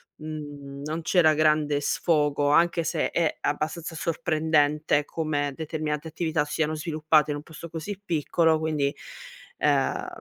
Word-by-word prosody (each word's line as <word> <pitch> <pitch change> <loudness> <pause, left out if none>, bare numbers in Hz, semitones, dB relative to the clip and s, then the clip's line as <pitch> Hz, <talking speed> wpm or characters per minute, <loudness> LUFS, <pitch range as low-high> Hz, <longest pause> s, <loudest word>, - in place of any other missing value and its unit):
mhmm, 145 -2 -8
non 160 +2 -3
c'era 160 -2 +4
grande 150 -1 +2
sfogo, 145 -1 +1
anche 170 +1 +3
se - - -1
è 165 -3 0
abbastanza 155 +3 -2
sorprendente 155 -2 +1
come 145 -2 -2
determinate 155 0 -3
attività 160 -2 -1
siano 155 +1 -1
sviluppate 155 -1 +2
in 145 - -2
un 145 - -9
posto 160 +1 -10
così 170 +5 -6
piccolo 160 -1 +2
quindi, 150 -3 -1 0.6
ehm, - - +1
155 Hz, 130 wpm, -26 LUFS, 150-160 Hz, 0.6 s, c'era